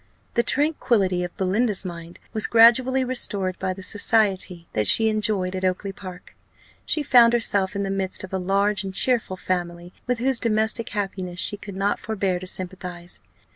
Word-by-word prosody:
The 235 - +2
tranquillity 235 - 0
of 175 - -7
Belinda's 200 +2 +1
mind 170 -1 -8 0.2
was 220 - +2
gradually 250 +3 +5
restored 205 -7 -1
by 190 -1 -2
the 190 +1 -8
society 195 -5 +1
that 105 -2 0
she 225 - +6
enjoyed 210 -4 0
at 185 - -5
Oakly 185 +2 -1
park. 185 -2 -11 0.5
She 305 - +1
found 240 -4 +5
herself 200 -4 +1
in 200 - -2
the 195 - -3
midst 190 -1 -3
of 190 - -9
a 190 - -1
large 200 +2 0
and 190 -1 -7
cheerful 230 -7 0
family, 175 -1 -4
with 250 0 0
whose 255 +1 +1
domestic 220 0 0
happiness 190 -4 -4
she 205 - +2
could 200 -1 -10
not 200 +1 -1
forbear 195 -4 -2
to 185 - -7
sympathize. 180 -1 -7
195 Hz, 175 wpm, -23 LUFS, 185-225 Hz, 0.5 s, she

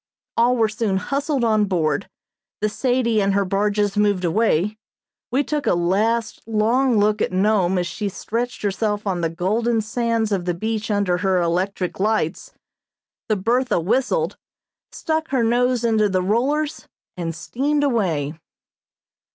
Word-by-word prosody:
All 245 +2 +3
were 225 -1 +3
soon 215 -3 -1
hustled 280 +4 -1
on 215 -2 +3
board; 165 -3 -1 0.5
the 215 - 0
"Sadie" 235 -1 +1
and 195 0 +1
her 200 0 +2
barges 205 +1 0
moved 205 -3 +2
away; 210 +1 +1 0.5
we 265 +4 +1
took 295 0 -2
a - - +3
last, 210 +6 0
long 230 +3 +2
look 210 +1 +2
at - - 0
Nome 190 -1 +2
as 175 - 0
she 185 +5 -3
stretched 235 +5 -4
herself 205 +1 -1
on 185 -3 -1
the 165 - 0
golden 215 +8 0
sands 225 0 -1
of 190 -3 -1
the 175 -1 -1
beach 220 +3 -3
under 200 -4 +1
her 190 -1 +2
electric 180 +2 -1
lights; 205 -5 -1 0.8
the 215 - +3
"Bertha" 240 +3 +1
whistled, 255 - 0 0.5
stuck 320 0 -2
her 260 -4 +1
nose 245 +1 +2
into 220 -3 +2
the 185 -1 0
rollers 280 +10 0 0.3
and 165 -2 -4
steamed 285 - -1
away. 175 - 0
215 Hz, 150 wpm, -21 LUFS, 190-235 Hz, 0.8 s, All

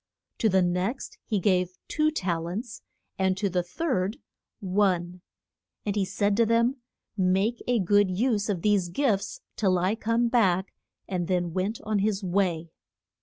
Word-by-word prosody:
To 220 - +3
the 190 -1 +3
next 180 +9 -2
he 210 -3 0
gave 180 -1 +1
two 305 0 +2
tal 175 - -2
ents; 225 +7 -5 0.4
and 190 0 +2
to 200 0 0
the 180 0 +1
third 190 - -2 0.4
one. 185 -3 0 0.6
And 205 -1 -1
he 200 -2 +1
said 205 +1 0
to 230 - +5
them, 235 +4 +2 0.4
Make 195 +4 +1
a 245 -1 +3
good 205 0 +3
use 215 +2 0
of 185 -5 -2
these 205 -4 +2
gifts 205 0 -1
till 190 -4 +2
I 185 +3 +1
come 230 +1 +1
back; 195 -6 +2 0.3
and 180 -3 -2
then 175 -2 0
went 195 +5 -1
on 215 -1 0
his 205 0 0
way. 175 -3 0
195 Hz, 160 wpm, -27 LUFS, 180-220 Hz, 0.6 s, to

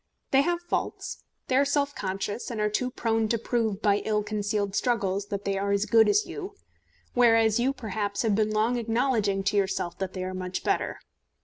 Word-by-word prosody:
They 270 - +6
have 345 +3 -1
faults. 345 - -3 0.2
They 255 - +1
are 275 - +5
self 285 0 0
conscious, 195 +2 -3
and 230 -3 -4
are 210 0 +1
too 250 +4 0
prone 225 -2 0
to 230 - +1
prove 225 -3 -1
by 205 -2 +4
ill 210 -1 0
concealed 205 -1 -2
struggles 200 -5 0
that 200 -1 -4
they 195 -1 0
are 200 0 -1
as 200 +1 +2
good 220 +1 +5
as 415 +1 +3
you, 410 0 -7 0.6
whereas 225 -2 +4
you 255 +3 +2
perhaps 210 -5 -3
have 220 -2 +2
been 215 +1 +2
long 215 +3 +1
acknowledging 225 -4 +1
to 205 +1 +1
yourself 190 -3 -1
that 190 -1 -3
they 185 - -4
are 185 0 -4
much 185 0 -4
better. - - -1
215 Hz, 200 wpm, -27 LUFS, 200-240 Hz, 0.6 s, They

